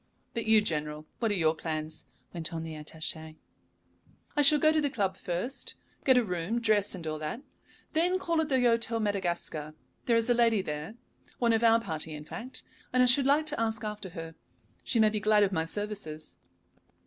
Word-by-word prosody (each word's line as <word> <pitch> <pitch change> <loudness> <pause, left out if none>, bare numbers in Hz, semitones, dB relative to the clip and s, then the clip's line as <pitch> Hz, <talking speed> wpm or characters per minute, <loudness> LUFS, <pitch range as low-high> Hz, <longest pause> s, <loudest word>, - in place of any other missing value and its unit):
"But 230 -2 -2
you, 220 -1 +6
General, 150 -3 -3
what 230 - +1
are 205 - +1
your 160 -4 +3
plans?" 155 -1 -5 0.3
went 165 -3 -2
on 165 -1 -4
the 160 -1 -6
attaché. 155 +1 -6 1.0
"I 295 - +4
shall 300 +1 +6
go 310 +1 +4
to 315 -1 +2
the 290 - +1
club 195 -7 -1
first, 185 +10 -4 0.3
get 260 -2 +5
a 250 - +4
room, 180 +3 -2
dress, 215 -4 +2
and 175 -3 -8
all 155 -1 -3
that. 155 - -4 0.5
Then 355 +3 +2
call 335 -3 0
at 315 - -2
the 265 - +3
Hôtel 230 -2 +2
Madagascar. 175 -7 -2 0.3
There 235 -2 +4
is 230 - +1
a 245 - +4
lady 230 -4 +3
there, 150 +6 -5 0.4
one 235 -2 +3
of 225 +1 +1
our 230 0 +6
party, 160 -6 -4
in 150 0 -8
fact, 240 +10 -6 0.3
and 255 0 +4
I - - +6
should 260 +2 +5
like 295 +3 +4
to 305 - -1
ask 225 0 -1
after 210 -2 -5
her. 165 0 -6 0.5
She 235 - +1
may 215 -1 +6
be 215 0 -2
glad 210 0 +4
of 200 - +2
my 160 -4 0
services." 165 -5 -5
210 Hz, 200 wpm, -29 LUFS, 160-235 Hz, 1.0 s, you